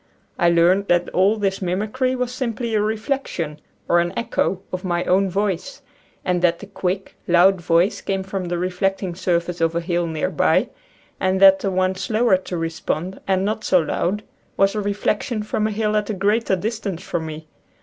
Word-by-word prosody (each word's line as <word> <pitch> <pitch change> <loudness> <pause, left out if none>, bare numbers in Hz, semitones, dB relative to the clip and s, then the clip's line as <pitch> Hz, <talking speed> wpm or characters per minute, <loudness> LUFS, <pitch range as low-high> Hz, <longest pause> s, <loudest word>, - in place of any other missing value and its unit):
I 175 -2 +4
learned 175 +4 +3
that 175 0 +2
all 195 +4 +3
this 195 -2 -1
mimicry 215 +8 -1
was 250 -1 -2
simply 235 -2 -3
a 215 - +2
reflection, 215 - -2 0.3
or 175 - +4
an 175 +1 0
echo, 230 -5 0
of 185 - -3
my 175 -2 0
own 190 +1 +2
voice, 200 +6 -2 0.4
and 180 -1 +1
that 170 -1 +3
the 205 - -10
quick, 190 -1 -3
loud 180 +2 +5
voice 170 +4 +2
came 195 -1 -2
from 190 -1 -4
the 175 0 -2
reflecting 185 +1 -1
surface 175 -1 -1
of 165 0 +1
a - - +2
hill 170 0 -1
near 160 -2 -2
by, - - +2 0.5
and 190 0 +1
that 195 0 +8
the 195 - -1
one 185 0 +1
slower 215 +1 +2
to 185 -1 -6
re 165 0 -1
spond 165 +3 -4
and 190 0 +1
not 215 +1 -2
so 185 - +4
loud 185 +5 -1 0.3
was 195 0 +3
a 215 - -1
reflection 210 +2 -1
from 215 0 -1
a - - -2
hill 215 0 0
at 210 0 0
a 215 - -1
greater 205 +2 +1
distance 200 -2 -4
from 165 -4 -3
me. 155 0 -8
190 Hz, 190 wpm, -21 LUFS, 175-210 Hz, 0.5 s, that